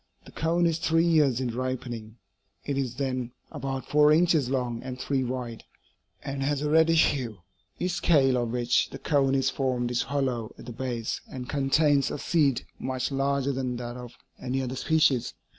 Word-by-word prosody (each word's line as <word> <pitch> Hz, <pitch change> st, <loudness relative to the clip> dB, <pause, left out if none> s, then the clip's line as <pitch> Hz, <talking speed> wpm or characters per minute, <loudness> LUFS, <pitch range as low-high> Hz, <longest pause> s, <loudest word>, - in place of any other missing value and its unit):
The -, -, -13 dB
cone 170 Hz, +2 st, +1 dB
is 165 Hz, -1 st, +1 dB
three 165 Hz, -1 st, +2 dB
years 150 Hz, -7 st, +3 dB
in 125 Hz, -3 st, -2 dB
ripening; 120 Hz, -3 st, -4 dB, 0.5 s
it 140 Hz, -, -1 dB
is 130 Hz, -3 st, -2 dB
then 130 Hz, -2 st, -2 dB, 0.2 s
about 135 Hz, 0 st, -4 dB
four 150 Hz, 0 st, +5 dB
inches 160 Hz, -4 st, +3 dB
long 125 Hz, -3 st, -1 dB
and 130 Hz, 0 st, -7 dB
three 135 Hz, 0 st, 0 dB
wide, 125 Hz, -2 st, -4 dB, 0.6 s
and 135 Hz, -1 st, -4 dB
has 145 Hz, +1 st, 0 dB
a 150 Hz, -, 0 dB
reddish 160 Hz, 0 st, +5 dB
hue. 115 Hz, -10 st, -5 dB, 0.3 s
Each 180 Hz, -, -1 dB
scale 140 Hz, -7 st, +3 dB
of 120 Hz, -1 st, -1 dB
which 120 Hz, 0 st, +1 dB
the -, -, -8 dB
cone 135 Hz, -3 st, +2 dB
is 135 Hz, -, +2 dB
formed 125 Hz, -3 st, -1 dB
is 120 Hz, -, +1 dB
hollow 130 Hz, -6 st, -2 dB
at -, -, -11 dB
the 120 Hz, -, -7 dB
base 120 Hz, -2 st, -3 dB
and 125 Hz, -1 st, -6 dB
contains 140 Hz, 0 st, +2 dB
a -, -, -4 dB
seed 145 Hz, -4 st, +1 dB
much 130 Hz, +1 st, -2 dB
larger 140 Hz, 0 st, 0 dB
than 130 Hz, -2 st, -2 dB
that 120 Hz, 0 st, -5 dB
of 125 Hz, -1 st, -10 dB, 0.2 s
any 130 Hz, +1 st, -2 dB
other 130 Hz, 0 st, -4 dB
species. 140 Hz, -4 st, +2 dB
135 Hz, 180 wpm, -27 LUFS, 125-145 Hz, 0.6 s, four